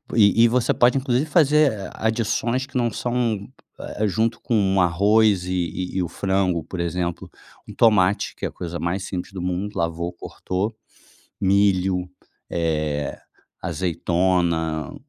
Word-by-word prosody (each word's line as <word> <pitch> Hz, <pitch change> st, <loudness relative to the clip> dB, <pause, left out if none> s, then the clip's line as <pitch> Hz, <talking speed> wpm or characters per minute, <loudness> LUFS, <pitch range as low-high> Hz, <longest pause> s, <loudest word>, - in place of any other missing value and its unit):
e 110 Hz, 0 st, +5 dB
e -, -, +6 dB
você 120 Hz, +1 st, +1 dB
pode 120 Hz, +2 st, +4 dB
inclusive 130 Hz, +1 st, +1 dB
fazer 150 Hz, -, +3 dB
adições 115 Hz, +3 st, 0 dB
que 130 Hz, -1 st, -5 dB
não 120 Hz, -1 st, +2 dB
são 115 Hz, -3 st, -2 dB, 0.3 s
eh, 105 Hz, +1 st, -2 dB
junto 110 Hz, +3 st, 0 dB
com 100 Hz, -4 st, +1 dB
arroz 100 Hz, +3 st, +3 dB
e 90 Hz, 0 st, -2 dB
e -, -, +2 dB
o 90 Hz, -, -1 dB
frango, 95 Hz, -3 st, 0 dB
por 90 Hz, -, -7 dB
exemplo, 85 Hz, 0 st, -3 dB, 0.4 s
um -, -, -9 dB
tomate 100 Hz, -4 st, +3 dB
que -, -, -5 dB
é -, -, +1 dB
a -, -, -8 dB
coisa 85 Hz, -1 st, -6 dB
mais 90 Hz, +3 st, -2 dB
simples 95 Hz, -1 st, -5 dB
do 95 Hz, -, -5 dB
mundo, 90 Hz, +4 st, -3 dB
lavou, 85 Hz, +1 st, -2 dB
cortou, 95 Hz, +4 st, -4 dB, 0.7 s
milho, 95 Hz, -2 st, +2 dB, 0.4 s
eh, 75 Hz, -3 st, -1 dB, 0.4 s
azeitona, 85 Hz, -2 st, 0 dB
95 Hz, 140 wpm, -23 LUFS, 90-110 Hz, 0.7 s, e